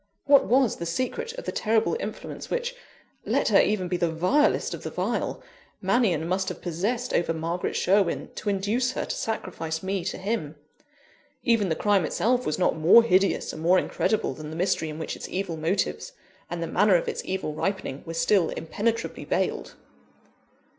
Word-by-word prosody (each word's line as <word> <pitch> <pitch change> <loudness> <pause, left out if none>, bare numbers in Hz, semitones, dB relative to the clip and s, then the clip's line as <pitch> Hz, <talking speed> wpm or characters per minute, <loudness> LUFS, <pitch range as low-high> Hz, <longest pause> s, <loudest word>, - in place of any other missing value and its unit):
What 280 -1 +6
was 255 -1 +3
the 170 - -4
secret 255 - -2
of - - -8
the - - -2
terrible 220 - +1
influence - - -6
which 485 0 -2 0.5
let - - +1
her - - +6
even 200 -4 0
be 180 0 -1
the 170 -1 0
vilest 185 - +2
of - - -6
the - - -5
vile - - -2 0.4
Mannion 180 -10 +1
must 185 +2 0
have 180 - -6
possessed 200 +9 -2
over 165 -1 +1
Margaret 165 +2 -2
Sherwin, 195 -1 +2
to 210 - -3
induce 215 +6 0
her - - -2
to - - -3
sacrifice 165 -7 -4
me 190 -1 -1
to 190 - -3
him? 190 -6 -3 0.9
Even 230 -5 +2
the 160 - +1
crime 205 -1 +2
itself 245 +9 +1
was 150 - 0
not 185 - +2
more 170 +9 +7
hideous 195 -3 +2
and 155 - -7
more 175 +3 +4
incredible 215 -3 0
than 150 +3 -8
the 160 - -7
mystery 170 -2 0
in 155 - -6
which 160 - -4
its - - -8
evil 185 -3 -3
motives, 170 - -1 0.4
and 170 -1 -3
the - - -1
manner 195 +3 +3
of 170 - +1
its - - -3
evil 185 -5 -3
ripening, 175 -4 -3
were 165 - -7
still 165 +1 +3
impenetrably 220 +8 -2
veiled. - - -2
190 Hz, 180 wpm, -26 LUFS, 165-225 Hz, 0.9 s, more